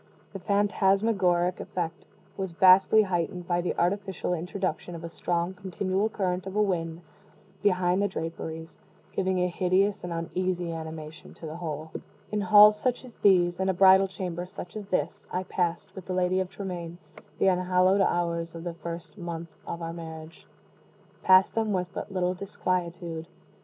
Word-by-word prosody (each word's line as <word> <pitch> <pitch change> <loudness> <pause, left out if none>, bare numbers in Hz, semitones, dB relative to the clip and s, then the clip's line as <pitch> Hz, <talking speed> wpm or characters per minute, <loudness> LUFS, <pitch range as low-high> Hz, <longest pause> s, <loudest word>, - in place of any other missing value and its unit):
The 195 - -5
phantasmagoric 195 -2 +2
effect 170 -2 -5 0.3
was 190 -3 -4
vastly 190 +4 +6
heightened 180 -1 -2
by 175 0 +1
the 175 - -2
artificial 190 0 -1
introduction 180 +1 -3
of 165 - -8
a 170 - -5
strong 175 +2 -1
continual 190 +2 -1
current 185 -3 -2
of 190 - -6
wind 175 -5 0 0.6
behind 185 -2 +2
the 205 - +2
draperies 165 -2 -6 0.3
giving 190 -1 0
a 180 0 +2
hideous 190 +3 +1
and 175 - -5
uneasy 175 +1 -2
animation 160 -1 -8
to - - -10
the 155 +1 -6
whole. 155 -2 -5 0.4
In 210 -1 0
halls 210 +2 +7
such 255 +1 -1
as 245 - -13
these 175 -3 +4
in 190 0 +1
a 190 - +1
bridal 190 +1 +7
chamber 180 -2 -5
such 180 -1 -9
as 210 -2 -6
this 175 -4 -2
I 185 - -1
passed, 180 +1 -2
with 190 -2 -10
the 185 - -2
Lady 185 0 +2
of 185 -1 -2
Tremaine, 175 -3 -6 0.4
the 195 - +4
unhallowed 185 +1 +3
hours 170 -2 0
of 165 - -7
the 175 -1 -4
first 170 +3 -8
month 170 -1 -5 0.2
of 170 0 -5
our 165 0 -4
marriage 160 -1 -9 0.7
passed 185 0 +5
them 220 -2 0
with 180 -1 -2
but - - -6
little 180 -1 0
disquietude. 175 -3 -3
180 Hz, 160 wpm, -27 LUFS, 170-190 Hz, 0.7 s, halls